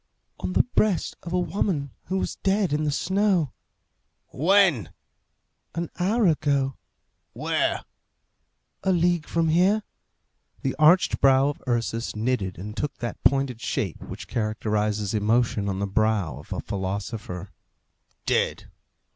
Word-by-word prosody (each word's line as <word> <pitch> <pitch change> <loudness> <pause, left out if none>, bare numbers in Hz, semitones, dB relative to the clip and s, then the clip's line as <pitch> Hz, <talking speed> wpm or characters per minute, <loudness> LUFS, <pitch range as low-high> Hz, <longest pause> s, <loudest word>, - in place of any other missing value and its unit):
"On 90 0 -3
the 110 - +5
breast 180 +10 +1
of 170 - -7
a 180 - +2
woman 175 -6 -1
who 190 - -1
was - - -2
dead 195 -4 +1
in 155 +1 +1
the 150 - +1
snow." 190 - +1 0.8
"When?" 175 - +3 0.9
"An 170 0 -3
hour 210 +5 +2
ago." 140 -5 +1 0.6
"Where?" - - 0 1.0
"A 190 - +1
league 175 -2 +2
from 165 -1 +1
here." 190 +6 +3 0.8
The 135 - -1
arched 165 +4 +5
brow 135 +1 +5
of 145 - -6
Ursus 115 -1 -1
knitted 105 -4 -1
and 105 +4 -7
took 145 +3 -3
that 120 - -5
pointed 135 -4 +2
shape - - -2
which - - -8
characterizes 105 -1 -1
emotion 110 -1 +1
on 95 - -2
the 100 - -1
brow 100 - 0
of - - -15
a - - -2
philosopher. 95 -1 -4 0.7
"Dead! - - 0
135 Hz, 130 wpm, -25 LUFS, 110-175 Hz, 1.0 s, the